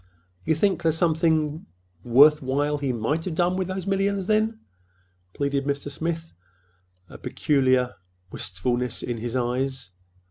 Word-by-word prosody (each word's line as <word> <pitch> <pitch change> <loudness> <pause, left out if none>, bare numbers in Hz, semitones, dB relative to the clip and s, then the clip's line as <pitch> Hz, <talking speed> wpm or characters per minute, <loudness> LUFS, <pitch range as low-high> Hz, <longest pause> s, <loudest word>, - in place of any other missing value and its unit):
"You 160 - +2
think—there's 170 -2 +1
something 160 -2 +1 0.4
worth 145 +6 +6
while 145 +3 0
he 140 -2 -1
might 125 +8 -1
have 175 -4 -3
done 175 +2 +2
with 185 -1 -1
those 185 -1 -4
millions, 195 0 0
then?" 220 +2 +1 0.7
pleaded 140 -1 -1
Mr. 140 0 -2
Smith, 165 +2 -4 0.7
a - - -34
sudden - - -12
peculiar 130 -3 +1 0.4
wistfulness 120 +7 -2
in 120 -1 -3
his 120 +2 -4
eyes. 125 -2 -2
150 Hz, 135 wpm, -25 LUFS, 130-170 Hz, 0.7 s, worth